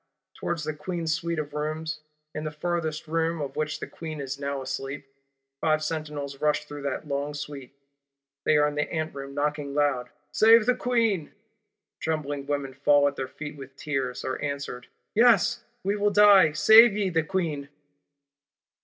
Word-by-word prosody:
towards 165 -3 -3
the 155 +1 -2
Queen's 165 +1 -2
Suite 170 0 -2
of 150 -1 -4
Rooms, 155 +1 -3 0.3
in 150 - -4
the 155 - -2
furtherest 155 0 -3
room 165 +1 0
of 140 -2 -4
which 150 -1 -2
the - - -4
Queen 155 -2 -7
is 135 0 -5
now 140 0 -3
asleep. 135 +2 -5 0.5
Five 155 0 +1
sentinels 150 -3 -4
rush 150 0 +1
through 145 -1 -8
that 145 +3 -5
long 140 +1 -2
Suite; 140 -2 -8 0.7
they 150 - +4
are 150 0 +4
in 150 - -3
the 150 0 -2
Anteroom 140 -4 -4
knocking 145 -1 -2
loud: 145 -4 +1 0.2
'Save 225 0 +6
the 250 - +4
Queen!' 230 -10 0 0.7
Trembling 145 -3 -3
women 140 -2 -2
fall 145 +1 +4
at 140 - -2
their 130 - -4
feet 150 +2 -8
with 135 -1 -11
tears; 135 -4 -3
are 130 - -3
answered: 140 -4 -4 0.3
'Yes, 235 +1 +4 0.2
we 200 +2 0
will 205 0 +2
die; 200 -5 +7
save 220 +8 +7
ye 195 -3 0
the 165 -1 +2
Queen! 155 -4 -2
150 Hz, 165 wpm, -26 LUFS, 140-165 Hz, 0.7 s, die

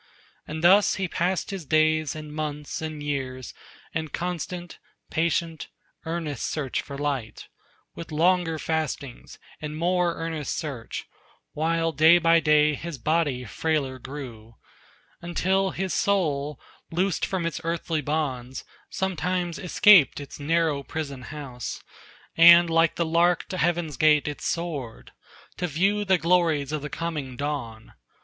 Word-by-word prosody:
And 155 +1 -5
thus 195 +4 +6
he 190 -1 -2
passed 180 +3 -1
his 195 -3 -5
days 155 0 +2
and 155 -1 -8
months 150 -1 -4
and 155 -2 -5
years, 130 -3 -4 0.4
In 160 -1 -2
constant, 175 +1 -5 0.3
patient, 165 -1 -1 0.4
earnest 160 -5 -3
search 140 -5 -2
for 140 - -8
light, 140 -6 -3 0.4
With 170 0 -9
longer 165 +1 +2
fastings 155 -5 -4 0.2
and 150 0 -5
more 175 +1 +1
earnest 160 -3 -3
search, 135 -8 -5 0.5
While 165 +1 0
day 160 +3 +6
by 165 0 +4
day 150 -1 +4
his 165 +1 -6
body 145 -2 0
frailer 135 +1 -1
grew, 120 -5 -9 0.7
Until 190 +3 +1
his 190 0 -3
soul, 150 -8 0 0.3
loosed 180 +2 0
from 185 -3 -1
its 165 -1 -3
earthly 165 -1 -1
bonds, 135 -4 -3 0.3
Sometimes 180 -2 -2
escaped 180 -4 +6
its 145 0 -9
narrow 160 -1 +1
prison 140 -2 -5
house, 135 -4 -7 0.5
And 170 0 +8
like 165 0 +3
the 170 - 0
lark 170 +2 +2
to 185 - -4
heaven's 170 -4 0
gate 150 0 +4
it 150 - -5
soared, 150 -9 -4 0.5
To 180 - -1
view 195 +7 +1
the 190 -2 +3
glories 165 -5 +2
of 155 -1 -2
the 150 - -5
coming 150 -6 -4
dawn. 130 -6 -5
160 Hz, 135 wpm, -25 LUFS, 145-170 Hz, 0.7 s, And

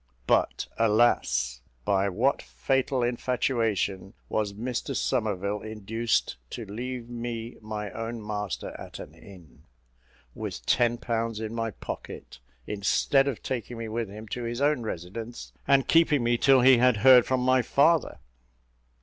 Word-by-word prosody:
But, - - +1
alas! 105 - +2 0.2
by 100 0 +2
what 120 +9 +1
fatal 135 -1 -1
infatuation 115 -5 -1
was 105 -2 -1
Mr 120 +4 -4
Somerville 105 -2 -1
induced 110 - -1
to 115 - -6
leave 120 +4 -5
me 120 -1 -5
my 105 -1 -5
own 115 +1 -5
master 105 -2 -4
at - - -9
an - - -10
inn, 90 -9 -16 0.7
with - - -6
ten 120 -1 +2
pounds 115 -2 -2
in 110 0 -4
my 115 -1 -2
pocket, 95 - -8 0.3
instead 105 +7 +2
of 135 -5 -3
taking 120 -2 -4
me 115 0 -5
with 110 -1 -3
him 110 +2 -9
to 125 - -4
his 120 +1 -3
own 145 -2 +2
residence, 110 +3 -6
and 140 -1 +4
keeping 160 -5 +4
me 120 0 +2
till 135 +2 +5
he 130 -1 +7
had 125 -2 +4
heard 125 -2 +8
from 130 -1 +1
my 130 0 +4
father? 155 +6 +2
115 Hz, 140 wpm, -27 LUFS, 105-125 Hz, 0.7 s, heard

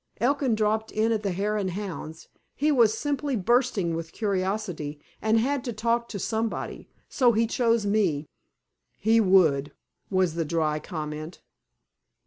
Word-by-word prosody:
Elkin 265 -1 +2
dropped 215 +1 0
in 220 +1 +1
at 220 -2 +1
the 200 - -1
Hare 205 +4 -1
and 195 -3 -1
Hounds. 175 -4 -6 0.3
He 300 +2 +2
was 230 -5 +4
simply 290 0 -1
bursting 220 -4 +1
with 165 0 -5
curiosity, 190 -7 -2 0.2
and 220 +1 +3
had 270 +2 0
to 240 - -3
talk 235 +2 0
to 210 - -5
somebody. 220 +3 -3 0.2
So 245 -3 +3
he 225 +1 +3
chose 230 -1 +1
me." 195 -8 +1 0.7
"He 225 +2 +3
would," 160 -8 +3 0.4
was 185 -4 +2
the 165 0 -1
dry 155 -1 0
comment. 155 +1 -6
210 Hz, 145 wpm, -26 LUFS, 170-230 Hz, 0.7 s, was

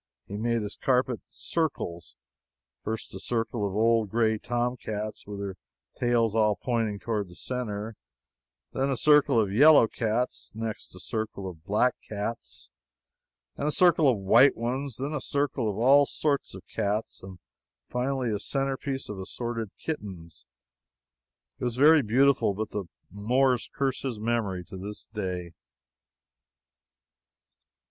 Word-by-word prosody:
He 100 - -7
made 115 +1 0
his 105 - -5
carpet 125 -2 +1
in - - -45
circles 85 - -3 0.7
first 110 +1 -4
a 95 - -6
circle 115 0 -1
of 95 - -5
old 115 -1 +3
gray 110 0 +2
tomcats, 120 -4 -3
with 105 -1 -6
their 100 -1 -5 0.4
tails 120 -3 +2
all 105 -2 +3
pointing 110 0 -1
toward 105 -2 -2
the 90 - -14
center; 110 -3 -4 0.8
then 135 +1 0
a 135 - 0
circle 145 -3 +5
of 100 -3 +1
yellow 145 +1 +7
cats; 115 +2 -2
next 110 -4 -5
a - - -9
circle 105 0 -4
of 80 -4 -9
black 105 +5 +3 0.2
cats 105 +2 -5 0.8
and 145 - -2
a - - +2
circle 170 -2 +5
of 120 - +2
white 115 +8 +5
ones; 130 +2 -2
then 140 +4 -3
a 150 - -2
circle 140 -4 0
of 100 - -4
all 135 +4 +6
sorts 145 -9 -1
of 95 - -11
cats; 105 +2 -2
and, 95 -1 -10 0.5
finally, 125 -1 -1
a 105 - -1
centerpiece 135 +1 -2
of 105 -2 -6
assorted 115 +3 -4
kittens. 95 - -7 1.1
It - - -7
was 120 -2 -1
very 150 +4 +7
beautiful, 130 -2 +3
but 110 +1 -4
the 100 -2 -3 0.3
Moors 125 +5 +1
curse 135 -2 -1
his 125 -6 -3
memory 105 -5 -1
to 95 - -10
this 105 +3 -7
day. 90 -5 -3
115 Hz, 145 wpm, -27 LUFS, 105-130 Hz, 1.1 s, yellow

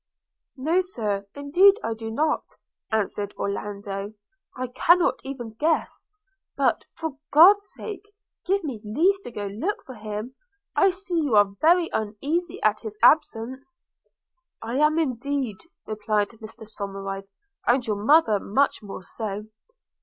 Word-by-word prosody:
'No, 320 +8 +2
Sir, 210 - -3
indeed 350 +8 +5
I 225 - -1
do 225 0 -6
not,' 300 +7 -1 0.4
answered 205 -1 -1
Orlando; 200 0 -4 0.4
'I 255 0 -2
cannot 345 +6 +4
even 260 -4 -6
guess 320 +2 0 0.3
– 390 - -53
but, - - +2
for 315 -4 -5
God's 400 +7 +7
sake, 415 -1 -8 0.3
give 390 +1 +1
me 260 -9 -5
leave 345 - +2
to - - -8
go 210 -3 -5
look 230 - -3
for 260 - -9
him. 215 +2 -6 0.4
I 390 - +5
see 370 -2 -2
you 280 -7 +1
are 205 -1 +5
very 340 +2 +5
uneasy 280 +11 -2
at 215 0 +3
his 215 -1 -8
absence.' 260 +4 +2 0.8
'I 235 +3 -3
am 300 +2 +3
indeed,' 270 - -2 0.2
replied 210 -1 0
Mr 220 -1 -12
Somerive, 195 -2 -6 0.4
'and 245 0 +3
your 205 -2 -2
mother 230 -6 +5
much 270 +8 +1
more 195 -3 -8
so.' 210 0 -5
240 Hz, 140 wpm, -25 LUFS, 210-320 Hz, 0.8 s, God's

